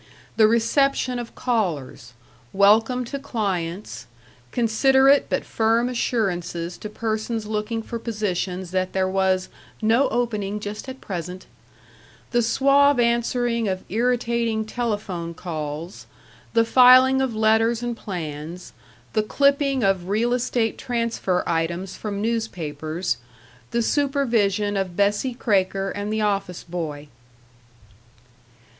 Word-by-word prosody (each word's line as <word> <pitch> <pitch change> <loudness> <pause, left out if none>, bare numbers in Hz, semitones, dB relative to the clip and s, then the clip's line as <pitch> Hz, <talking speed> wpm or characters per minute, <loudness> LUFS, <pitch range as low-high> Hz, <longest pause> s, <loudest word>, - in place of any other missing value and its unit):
The 220 -1 +6
reception 250 +3 +1
of 235 -1 -8
callers; 180 - -2 0.4
welcome 220 +5 +4
to 280 +4 -5
clients; 200 -8 -3 0.4
considerate 265 +4 +4
but - - -1
firm 230 +2 +1
assurances 180 -8 -2
to 210 - -6
persons 220 +1 -3
looking 215 +1 -3
for 230 +1 -5
positions 190 -5 -3
that 185 0 -1
there 190 -1 +1
was 190 -1 +1 0.3
"no 230 +5 +3
opening 210 -4 -1
just 210 +5 -6
at 260 0 -9
present 180 -1 -6 0.4
" - - -27
The 240 -1 +3
suave 275 +3 +4
answering 235 -1 +1
of 185 -1 -2
irritating 235 0 0
telephone 205 -8 -3
calls.... 160 0 -6 0.5
The 230 -1 +4
filing 255 +2 +7
of 260 -4 -1
letters 225 +2 +2
and 240 -1 -2
plans; 170 -3 -6 0.4
the 215 - +3
clipping 280 +3 +2
of 190 -2 +1
real 230 +4 +1
estate 240 -2 0
transfer 230 -7 -1
items 170 +3 -2
from 205 -1 -4
newspapers.... 175 -7 -2 0.5
The 235 0 0
supervision 230 -8 +1
of 190 -3 -2
Bessie 205 +6 +1
Kraker 195 -4 0
and 205 +1 -4
the 220 0 0
office 195 -4 -1
boy. 155 -4 -5
215 Hz, 115 wpm, -23 LUFS, 185-240 Hz, 0.5 s, filing